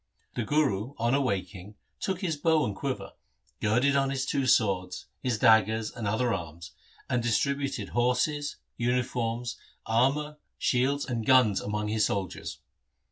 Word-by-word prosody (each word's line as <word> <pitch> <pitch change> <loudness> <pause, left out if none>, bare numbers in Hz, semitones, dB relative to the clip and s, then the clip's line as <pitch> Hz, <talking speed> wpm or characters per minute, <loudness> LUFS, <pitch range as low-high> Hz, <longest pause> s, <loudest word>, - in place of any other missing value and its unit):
The 120 - -2
Guru 135 -2 0
on 115 +2 +1
awaking 100 -6 -2 0.2
took 190 -2 -2
his 170 -5 -1
bow 160 +1 +2
and 100 - -3
quiver, 100 -4 -4 0.5
girded 120 +7 +2
on 135 -1 +2
his 135 -1 -1
two 135 -1 0
swords, 95 -7 +1 0.2
his 125 -3 0
daggers 110 -2 +4
and 115 -4 -5
other 115 +3 +1
arms, 85 -2 -6 0.4
and 120 -2 0
distributed 140 +5 0
horses, 145 +5 0 0.2
uniforms, 120 -1 -1 0.3
armour, 140 +6 +1 0.2
shields, 135 +3 +1
and 120 -3 -3
guns 110 -5 +4
among 105 0 -2
his 110 -1 +2
soldiers. 95 -2 -4
120 Hz, 135 wpm, -28 LUFS, 105-135 Hz, 0.5 s, daggers